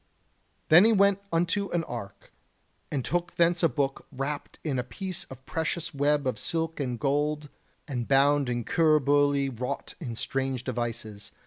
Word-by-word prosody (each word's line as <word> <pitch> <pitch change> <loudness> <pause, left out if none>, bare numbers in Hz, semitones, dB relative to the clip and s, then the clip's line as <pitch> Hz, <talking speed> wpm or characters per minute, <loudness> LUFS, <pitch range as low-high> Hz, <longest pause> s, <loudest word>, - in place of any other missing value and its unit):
Then 170 +4 +9
he 225 - +5
went 200 -2 +4
unto 175 +4 +1
an 170 -1 0
ark, 115 -8 -8 0.6
and 135 -4 -2
took 175 +1 -1
thence 170 +1 +3
a 165 - +4
book 135 -2 -2
wrapped 140 +3 -4
in 140 -5 -1
a - - -1
piece 185 - -6
of 130 0 -12
precious 165 +1 -2
web 145 0 +2
of 130 -4 -1
silk 165 -1 -2
and 125 -4 -2
gold, 145 +3 0 0.4
and 125 -4 -3
bound 140 0 +4
in 120 -1 -1
cuir 155 +3 +4
bouilly 145 0 +3
wrought 125 -1 -4
in 120 -8 -5
strange 130 +1 -2
devices. 115 -4 -4
145 Hz, 160 wpm, -28 LUFS, 130-165 Hz, 0.6 s, Then